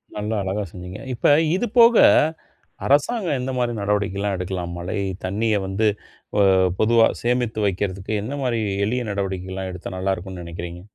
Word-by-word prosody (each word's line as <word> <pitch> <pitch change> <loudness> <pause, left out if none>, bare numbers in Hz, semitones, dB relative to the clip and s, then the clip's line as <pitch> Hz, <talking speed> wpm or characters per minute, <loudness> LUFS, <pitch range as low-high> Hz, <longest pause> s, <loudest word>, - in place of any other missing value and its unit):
நல்லா 105 +1 -2
அழகா 95 +2 -2
செஞ்சீங்க. 90 +3 -8
இப்ப 120 - -6 0.3
இது 235 - 0
போக, 235 0 +8 0.9
அரசாங்கம் 155 - +2
எந்த 130 +1 -3
மாதிரி 120 -1 0
நடவடிக்கை 100 -1 0
எல்லாம் 100 -1 -1
எடுக்கலாம்? 90 -1 -4
மழைத் 95 +1 -3
தண்ணிய 105 +4 0
வந்து 100 +3 +1 0.5
அ - - +6 0.4
பொதுவா 115 +1 +5
சேமித்து 120 -2 0
வைக்கறதுக்கு, 95 +1 -3
எந்த 130 +7 -4
மாதிரி 120 -3 0 0.3
எளிய 125 +4 -1
நடவடிக்கை 95 -2 -3
எல்லாம் 95 0 -4
எடுத்தா 90 +1 -7
நல்லா 95 +1 0
இருக்கும்ன்னு 95 -1 -8
நெனைக்கிறீங்க? 85 +1 -7
100 Hz, 155 wpm, -22 LUFS, 95-115 Hz, 0.9 s, போக